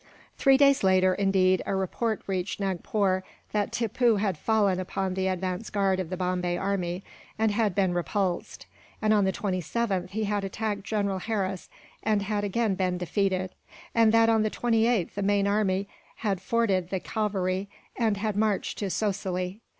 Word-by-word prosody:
Three 270 Hz, -1 st, +5 dB
days 275 Hz, -3 st, +4 dB
later, 185 Hz, -1 st, +4 dB
indeed, 190 Hz, -1 st, +2 dB
a -, -, 0 dB
report 215 Hz, +4 st, -1 dB
reached 190 Hz, 0 st, -2 dB
Nagpore 190 Hz, 0 st, 0 dB, 0.3 s
that 210 Hz, -1 st, 0 dB
Tippoo 230 Hz, 0 st, +2 dB
had 200 Hz, -3 st, 0 dB
fallen 200 Hz, +1 st, +1 dB
upon 185 Hz, 0 st, -2 dB
the 190 Hz, 0 st, -1 dB
advance 185 Hz, +3 st, -2 dB
guard 195 Hz, -2 st, +1 dB
of 180 Hz, -3 st, -3 dB
the 185 Hz, -, -3 dB
Bombay 180 Hz, -1 st, -1 dB
army, 185 Hz, -1 st, -2 dB, 0.3 s
and 220 Hz, -1 st, +2 dB
had 205 Hz, -2 st, +1 dB
been 190 Hz, -3 st, +2 dB
repulsed; 175 Hz, +2 st, -2 dB, 0.3 s
and 215 Hz, 0 st, +2 dB
on 205 Hz, -2 st, +4 dB
the 190 Hz, -, +2 dB
27th 190 Hz, 0 st, -2 dB
he 220 Hz, +3 st, -2 dB
had 205 Hz, -1 st, -1 dB
attacked 205 Hz, +1 st, -3 dB
General 200 Hz, -3 st, -1 dB
Harris, 195 Hz, -3 st, -3 dB, 0.3 s
and 210 Hz, -2 st, +1 dB
had 205 Hz, 0 st, -1 dB
again 210 Hz, +1 st, +1 dB
been 185 Hz, -1 st, 0 dB
defeated; 185 Hz, 0 st, -1 dB, 0.4 s
and 225 Hz, -1 st, +5 dB
that 225 Hz, 0 st, +5 dB
on 225 Hz, -1 st, +4 dB
the 215 Hz, -, +1 dB
28th 225 Hz, -4 st, +1 dB
the 205 Hz, -, -3 dB
main 200 Hz, 0 st, +2 dB
army 200 Hz, -1 st, +1 dB, 0.3 s
had 195 Hz, -5 st, -2 dB
forded 195 Hz, -5 st, +1 dB
the 190 Hz, -, -1 dB
Cauvery, 195 Hz, -2 st, -2 dB, 0.3 s
and 220 Hz, -4 st, +1 dB
had 210 Hz, 0 st, -2 dB
marched 210 Hz, -1 st, 0 dB
to 200 Hz, -, -2 dB
Sosilly. 190 Hz, -1 st, -2 dB
195 Hz, 165 wpm, -27 LUFS, 185-215 Hz, 0.4 s, Three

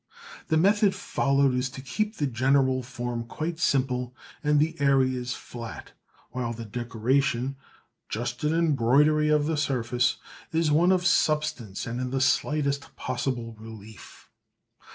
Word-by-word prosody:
The 160 Hz, -, +2 dB
method 200 Hz, +3 st, +3 dB
followed 140 Hz, -1 st, +1 dB
is 125 Hz, +1 st, 0 dB
to 130 Hz, -, -10 dB
keep 210 Hz, +11 st, -2 dB
the 145 Hz, -, 0 dB
general 130 Hz, +1 st, +2 dB
form 120 Hz, -1 st, -4 dB
quite 160 Hz, +7 st, -5 dB
simple 125 Hz, -4 st, 0 dB, 0.3 s
and 150 Hz, -1 st, +3 dB
the 160 Hz, +2 st, +1 dB
areas 130 Hz, -3 st, +2 dB
flat, 115 Hz, -2 st, -9 dB, 0.4 s
while 120 Hz, -2 st, -3 dB
the 115 Hz, 0 st, -7 dB
decoration, 120 Hz, +3 st, 0 dB, 0.5 s
just 120 Hz, +2 st, -4 dB
an 150 Hz, -, +2 dB
embroidery 150 Hz, -1 st, +3 dB
of 150 Hz, -1 st, +3 dB
the 160 Hz, 0 st, -1 dB
surface, 125 Hz, -3 st, 0 dB, 0.3 s
is 165 Hz, -1 st, +1 dB
of -, -, +2 dB
one 180 Hz, +4 st, +4 dB
substance 150 Hz, -, 0 dB
and 120 Hz, +2 st, -4 dB
in 130 Hz, -, -2 dB
the 135 Hz, +1 st, -1 dB
slightest 140 Hz, +1 st, 0 dB
possible 125 Hz, -2 st, -3 dB
relief. 110 Hz, -2 st, -12 dB
130 Hz, 135 wpm, -26 LUFS, 120-150 Hz, 0.5 s, one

